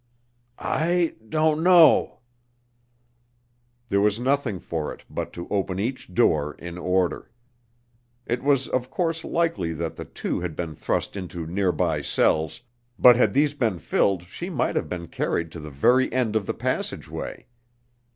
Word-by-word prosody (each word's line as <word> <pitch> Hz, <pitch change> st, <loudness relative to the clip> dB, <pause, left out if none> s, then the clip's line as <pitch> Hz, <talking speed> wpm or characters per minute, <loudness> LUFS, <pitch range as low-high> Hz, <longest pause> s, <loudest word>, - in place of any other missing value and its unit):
"I 170 Hz, +1 st, +1 dB, 0.2 s
don't 155 Hz, +1 st, +2 dB
know." 175 Hz, -2 st, +5 dB, 1.7 s
There 100 Hz, 0 st, +2 dB
was 105 Hz, +1 st, +2 dB
nothing 130 Hz, -6 st, 0 dB
for 80 Hz, -3 st, -4 dB
it -, -, -11 dB
but -, -, -4 dB
to 85 Hz, -, -7 dB
open 95 Hz, -2 st, -1 dB
each 120 Hz, -1 st, -3 dB
door 75 Hz, -3 st, +2 dB
in 85 Hz, 0 st, -8 dB
order. 90 Hz, 0 st, 0 dB, 1.0 s
It 120 Hz, +1 st, -1 dB
was 140 Hz, -2 st, +2 dB
of 130 Hz, 0 st, -1 dB
course 165 Hz, +2 st, -1 dB
likely 165 Hz, -, 0 dB
that 80 Hz, +1 st, -4 dB
the -, -, -6 dB
two -, -, -3 dB
had 85 Hz, -3 st, -4 dB
been 85 Hz, -3 st, -4 dB
thrust -, -, -2 dB
into 90 Hz, -4 st, -5 dB
nearby 90 Hz, +2 st, 0 dB
cells, 80 Hz, +9 st, +1 dB, 0.4 s
but 125 Hz, -1 st, +8 dB
had 125 Hz, -, +2 dB
these 145 Hz, +1 st, +3 dB
been 115 Hz, -10 st, 0 dB
filled 90 Hz, +3 st, +1 dB
she 90 Hz, -, -7 dB
might -, -, -1 dB
have -, -, -1 dB
been 85 Hz, -2 st, -5 dB
carried 85 Hz, 0 st, -2 dB
to 85 Hz, -, -8 dB
the 75 Hz, 0 st, -8 dB
very 125 Hz, -, +3 dB
end 120 Hz, -4 st, 0 dB
of 105 Hz, -3 st, 0 dB
the -, -, -2 dB
passageway. -, -, -4 dB
100 Hz, 150 wpm, -24 LUFS, 85-135 Hz, 1.7 s, but